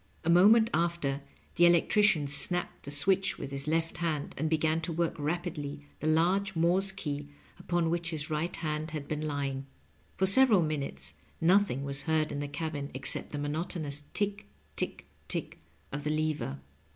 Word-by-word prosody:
A 170 - +2
moment 220 +6 +6
after, 170 -5 -1 0.4
the 175 0 +7
electrician 175 -1 +4
snapped 155 +4 +1
a - - -3
switch 190 +7 +2
with 140 - -7
his 140 +1 -2
left 165 +1 -1
hand, 160 -4 -2
and 155 +3 -2
began 160 0 +1
to 165 - -2
work 170 0 -1
rapidly 150 -2 -4
the 155 - -3
large 180 +5 +2
Morse 180 +4 +4
key 145 -6 -5 0.3
upon 175 -2 0
which 170 0 -1
his 155 -2 -3
right 155 +3 -2
hand 155 -1 -3
had 150 -3 -6
been 150 -1 -3
lying. 140 -3 -3 0.5
For 190 - +2
several 205 -2 +7
miuutes 135 - -4 0.3
nothing 180 -5 +2
waB 140 0 -2
heard 160 -1 +1
in 145 - -4
the 145 - -3
cabin 145 -1 -4
ex 130 - +2
cept - - -3
the 145 - -4
monotonous 150 0 -3
tick, 205 0 -1 0.3
tick - - -1 0.2
tick - - -2 0.3
of 145 +1 -5
the 150 - -2
lever. 155 - -2
160 Hz, 170 wpm, -29 LUFS, 145-175 Hz, 0.5 s, the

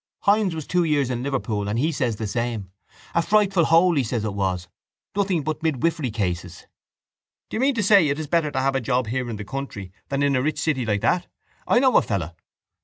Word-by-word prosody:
—Hynes 200 -4 +3
was 160 -3 -5
two 180 -1 +1
years 145 -5 +1
in 120 -1 -2
Liverpool 110 -7 -2
and 105 - -1
he 155 +7 +1
says 125 -6 -1
the 110 - -4
same. 110 -3 -3 0.4
A 170 - +3
frightful 195 -2 +3
hole 170 +2 +5
he 140 - +3
said 115 -1 -2
it 105 -2 -2
was. 95 -3 -2 0.5
Nothing 190 -6 +1
but 155 +2 -3
midwifery 160 -2 0
cases. 90 -5 -3 0.9
—Do - - -2
you - - -1
mean 275 0 +2
to 220 - 0
say 200 -5 +6
it 145 0 0
is 155 - -4
better 160 0 +1
to 135 -2 -1
have 135 +1 +1
a 135 - 0
job 125 +1 0
here 125 +2 -2
in 115 - -4
the 105 -1 -7
country 105 -8 -6 0.2
than 140 0 0
in 140 -1 +2
a 130 - +2
rich 155 +3 -1
city 130 -7 0
like 105 -2 0
that? 180 0 +1 0.4
I - - +4
know 260 +1 +5
a - - +6
fellow... 90 -5 -3
135 Hz, 230 wpm, -23 LUFS, 110-165 Hz, 0.9 s, say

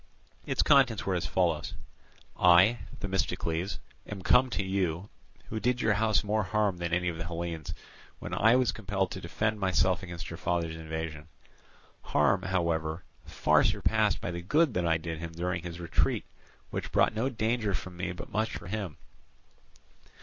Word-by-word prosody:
Its - - +2
contents 135 -7 +4
were 95 - 0
as 90 - -1
follows: 85 -4 0 0.6
"I, 90 +7 +6 0.2
Themistocles, 95 -2 -1 0.3
am 100 -3 -7
come 130 +1 +5
to 105 - -1
you, 95 -1 -1 0.4
who 110 - -3
did 125 +2 +1
your 110 -3 +3
house 110 0 +2
more 105 +1 +1
harm 100 -1 0
than 85 -1 -3
any 90 +1 +1
of 85 -2 -2
the 85 - -3
Hellenes, 85 -1 -4 0.4
when - - -7
I 115 +3 +5
was 130 -2 +3
compelled 100 -3 -2
to - - -6
defend 105 0 -1
myself 95 -1 +2
against 85 -3 -7
your 85 - -6
father's 85 -2 -1
invasion—harm, 80 -5 -3
however, 85 -3 -1 0.2
far - - +3
surpassed 110 -2 +2
by - - -3
the 85 0 -5
good 150 - +2
that 90 -3 0
I 80 -1 +3
did 80 0 -5
him 85 0 -6
during 90 +1 -2
his 85 0 -7
retreat, 85 -1 0 0.5
which - - -4
brought - - +3
no 115 +5 0
danger 110 -3 0
for 95 - -5
me 90 +1 -4
but 90 - -8
much 110 +1 0
for - - -11
him. 95 -4 -4
90 Hz, 165 wpm, -29 LUFS, 85-105 Hz, 0.6 s, I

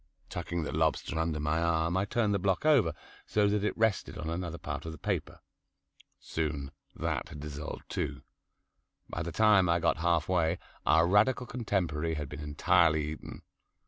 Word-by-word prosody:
Tucking 85 -1 -3
the - - -3
lobster 80 - 0
under 80 -2 0
my 75 +2 0
arm 85 0 +1
I 95 +1 +2
turned 105 0 +1
the 100 - +1
block 95 +6 0
over, 120 - +4 0.3
so 105 -1 +2
that 100 0 +1
it 105 - -1
rested 110 -3 +1
on 80 +1 -4
another 85 -1 -3
part 80 - -5
of - - -4
the - - -9
paper. - - -3 0.8
Soon 75 -4 -3 0.2
that - - -2
had 75 - -9
dissolved 75 +1 -6
too. - - -3 0.9
By - - -3
the 85 +2 -3
time 105 -2 +5
I - - +5
had 85 - -1
got - - +3
half 85 -1 +1
way 85 -2 +2 0.3
our 80 +3 +5
Radical 110 +7 +3
contemporary 85 -10 -1
had 75 -3 -4
been 75 - -7
entirely 75 +1 +2
eaten. 75 - -9
85 Hz, 175 wpm, -30 LUFS, 80-100 Hz, 0.9 s, time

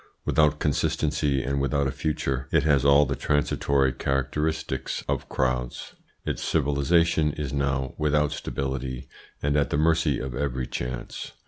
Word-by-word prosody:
Without 75 -1 +3
consistency 75 -1 0
and 70 +2 -1
without 70 +1 +1
a 65 - 0
future, 70 -2 -2
it 80 -3 +3
has 70 -4 +3
all 70 +1 +6
the 70 +1 -2
transitory 70 -2 +1
characteristics 70 +5 -2
of - - -2
crowds. 65 -1 -2 0.3
Its - - -2
civilisation 75 +2 +2
is 70 -3 -4
now 70 -2 -1
without 75 -1 +2
stability, 65 -2 -4 0.4
and 70 0 +1
at 75 -1 +2
the - - 0
mercy 80 -2 +2
of 65 -1 -5
every 65 -1 -2
chance. 60 -1 -5
70 Hz, 140 wpm, -26 LUFS, 65-75 Hz, 0.4 s, all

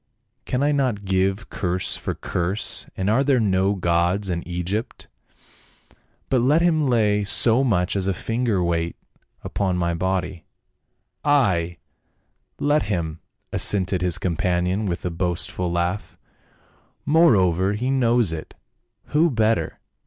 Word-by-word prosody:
" 115 +3 -50
Can 125 +2 -1
I 145 - +3
not 130 -8 0
give 95 +3 0
curse 90 -2 -2
for - - -4
curse? 90 +4 -3
and 95 - -1
are 115 +6 +3
there 135 -2 +3
not 95 -2 +1
gods 90 +3 +1
in 85 -1 -2
Eg>'pt? 90 +6 -4 1.2
But 130 -3 +2
let 150 +7 +3
him 155 -5 +2
lay 105 -4 +2
so 115 +5 +3
much 95 -9 +1
as 95 -1 -1
a 95 - +1
finger's 115 -3 -1
weight 85 -1 -1 0.5
upon 95 -3 -1
my 85 -1 0
body 95 0 -2 0.3
— - - -50
" - - -52
'Ay, 95 - +2 0.8
let 150 +1 +2
him 80 -5 -2 0.2
!" - - -27
assented 95 -2 +1
his 90 -2 +1
companion 90 +2 0
with 85 -1 -3
a 90 - -1
boast 90 0 -2
ful 90 -1 -3
laugh. 85 +4 -2 0.9
"Moreover, 100 - +4
he 125 +5 -1
knows 120 -6 +2
it; 80 -1 -7 0.5
who 160 +3 +3
better? 110 - 0
95 Hz, 145 wpm, -23 LUFS, 90-120 Hz, 1.2 s, Moreover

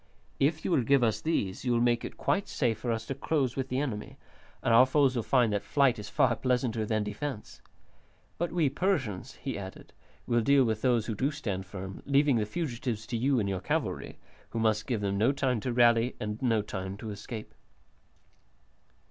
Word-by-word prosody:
If 155 +3 +1
you - - 0
will 140 - +4
give 135 +2 +3
us 110 -2 +1
these 100 - -1
you 125 -2 +1
will 120 - +2
make 120 0 +2
it - - -7
quite 200 - 0
safe 115 -5 0
for 120 +1 -2
us 110 -1 -2
to 135 - -3
close 135 -2 -1
with 135 -1 -3
the 130 - -1
enemy, 120 -8 -4 0.5
and 115 - +3
our 125 +3 +7
foes 135 -1 +3
will 120 - +1
find 120 -2 +2
that 100 - 0
flight 135 -5 +2
is 105 0 -7
far 115 +1 +3
pleasanter 125 -4 0
than 110 -1 +1
defence. 110 +3 -6 0.8
But 175 0 -1
we 165 -4 +2
Persians," 135 - -1
he 135 -6 -5
added, 95 -1 -9 0.3
"will 120 -1 +2
deal 140 +3 +5
with 110 -3 -1
those 120 -4 +2
who 115 - -2
do 130 +7 0
stand 100 -11 -4
firm, 95 0 -7
leaving 140 -2 +4
the 105 -2 0
fugitives 120 -5 -3
to 120 - -4
you 130 +3 +2
and 105 - 0
to 100 - -1
your 95 -2 -3
cavalry, - - -2 0.3
who - - -5
must 110 0 +1
give 120 -6 -1
them 100 -1 -1
no 115 +5 +4
time 135 -4 0
to 125 +4 -3
rally 120 0 +4
and 105 +1 -4
no 115 -5 +2
time 95 -1 -5
to 110 0 -6
escape." 105 +2 -7
120 Hz, 205 wpm, -29 LUFS, 105-135 Hz, 0.8 s, our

